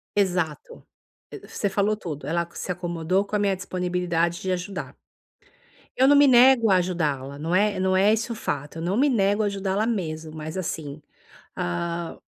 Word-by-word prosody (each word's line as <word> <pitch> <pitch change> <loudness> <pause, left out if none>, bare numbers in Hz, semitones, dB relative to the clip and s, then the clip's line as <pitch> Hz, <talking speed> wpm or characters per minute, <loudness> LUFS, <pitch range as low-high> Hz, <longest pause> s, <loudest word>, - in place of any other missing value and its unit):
Exato, 185 - -1 0.6
você 205 - -2
falou 205 +2 +1
tudo. 155 -8 -7
Ela 170 +1 -1
se 180 - -5
acomodou 175 +2 -1
com 205 - -4
a 210 - +2
minha 200 -2 +1
disponibilidade 180 -2 -1
de 190 - -2
ajudar. 185 +2 -4 1.0
Eu 260 - +5
não 285 - +6
me 285 0 +7
nego 245 -3 +6
a 185 - +6
ajudá-la, 150 -7 -2
não 165 +4 -3
é 205 0 +2
não 185 0 +1
é 200 +3 +4
isso 230 +2 -1
o - - -8
fato, 150 -7 -4
eu - - -5
não 185 +5 -1
me 280 +3 +4
nego 205 -2 +2
a - - +1
ajudá-la 200 +1 -1
mesmo, 160 -8 -3
mas 155 +2 -7
assim, 155 -5 -4 0.6
hã 170 - -3
185 Hz, 175 wpm, -24 LUFS, 165-205 Hz, 1.0 s, me